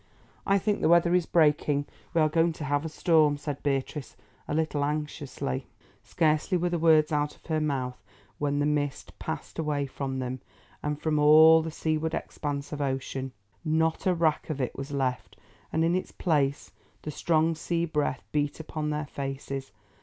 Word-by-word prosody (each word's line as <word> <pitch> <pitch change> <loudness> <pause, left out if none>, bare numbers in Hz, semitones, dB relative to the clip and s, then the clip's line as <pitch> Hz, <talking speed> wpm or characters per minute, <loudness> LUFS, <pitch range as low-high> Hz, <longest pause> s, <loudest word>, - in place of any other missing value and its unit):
"I 195 - +4
think 205 +2 0
the - - +3
weather 170 0 +5
is 180 -2 +2
breaking; 150 -3 +3 0.3
we 165 - +4
are 155 - +5
going 165 +2 +2
to 155 - -7
have 145 +1 0
a 160 - -3
storm," 155 -2 +3
said 145 -1 -5
Beatrice, 140 0 -2 0.3
a - - -2
little 155 -2 0
anxiously. 145 - -3 0.4
Scarcely 155 +3 +1
were 175 +1 0
the 175 - 0
words 155 -2 +5
out 150 0 0
of - - -27
her 160 -2 0
mouth 130 -4 -2 0.4
when 145 -1 0
the 145 - +2
mist 145 -2 -1
passed 160 0 -5
away 150 -3 0
from 135 0 -4
them, 130 0 -4 0.4
and 150 0 -2
from 155 -1 0
all 160 +2 +8
the 160 - -4
seaward 160 0 -1
expanse 145 -2 -4
of 150 -1 -4
ocean. 135 -1 -2 0.3
Not 160 +3 +1
a 180 - +3
wrack 165 -2 +1
of 150 -3 -3
it 130 - -2
was 135 +1 -6
left, 135 -3 -2 0.3
and 160 +1 +2
in 170 - +2
its 185 - -2
place 140 -5 0 0.3
the 155 - -4
strong 160 +2 +2
sea 170 +1 -1
breath 150 -4 -1
beat 145 0 -1
upon 155 -1 -4
their 150 0 -2
faces. 135 -1 -5
150 Hz, 180 wpm, -28 LUFS, 140-160 Hz, 0.4 s, all